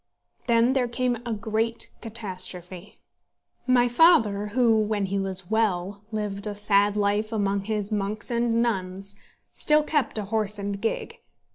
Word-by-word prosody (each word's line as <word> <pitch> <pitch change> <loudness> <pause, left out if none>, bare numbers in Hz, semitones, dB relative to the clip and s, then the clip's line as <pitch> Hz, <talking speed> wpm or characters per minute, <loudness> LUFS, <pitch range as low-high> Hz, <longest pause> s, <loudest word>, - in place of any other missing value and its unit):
Then 235 +1 +4
there 260 -2 +1
came 245 0 -1
a - - -2
great 220 +2 -2
catastrophe. 185 -4 -5 0.7
My 245 -1 +4
father, 235 - +4
who, 230 +1 +3
when 210 -1 0
he 195 +1 -2
was 190 0 -3
well, 200 -3 0
lived 210 -1 -2
a 205 - -4
sad 205 0 +2
life 205 +2 0
among 200 -2 -1
his 210 -1 -2
monks 210 +2 -2
and 235 0 +1
nuns, 195 -3 -2 0.4
still 300 0 +3
kept 295 -6 0
a 210 - -2
horse 210 0 -1
and 200 0 -4
gig. 225 - -3
210 Hz, 145 wpm, -25 LUFS, 200-230 Hz, 0.7 s, Then